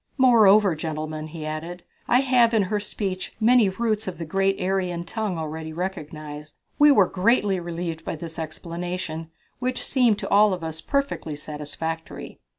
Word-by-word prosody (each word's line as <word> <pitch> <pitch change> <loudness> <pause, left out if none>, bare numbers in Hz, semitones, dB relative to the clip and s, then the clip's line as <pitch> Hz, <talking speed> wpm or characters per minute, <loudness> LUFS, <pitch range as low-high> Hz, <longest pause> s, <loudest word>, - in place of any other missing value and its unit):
"Moreover, 215 - +6
gentlemen," 155 0 -4
he 155 0 -7
added, 165 +3 -5 0.2
"I 245 +2 +4
have 245 -3 +4
in 215 - +4
her 210 - +2
speech 195 -2 -4
many 230 -2 +5
roots 215 +1 -1
of 185 - -4
the 165 - -5
great 195 +4 +1
Aryan 180 -2 -1
tongue 205 0 -3
already 160 0 -5
recognized." 155 -4 -6 0.2
We 295 0 +8
were 205 -9 +6
greatly 195 0 +2
relieved 170 -1 -5
by - - -4
this 165 +1 -8
explanation, 165 0 -5 0.3
which 255 0 -1
seemed 245 -6 +3
to - - -5
all 205 0 +5
of 180 - -10
us 160 0 -5
perfectly 280 - -2
satisfactory. 155 +2 -6
180 Hz, 155 wpm, -24 LUFS, 160-210 Hz, 0.3 s, We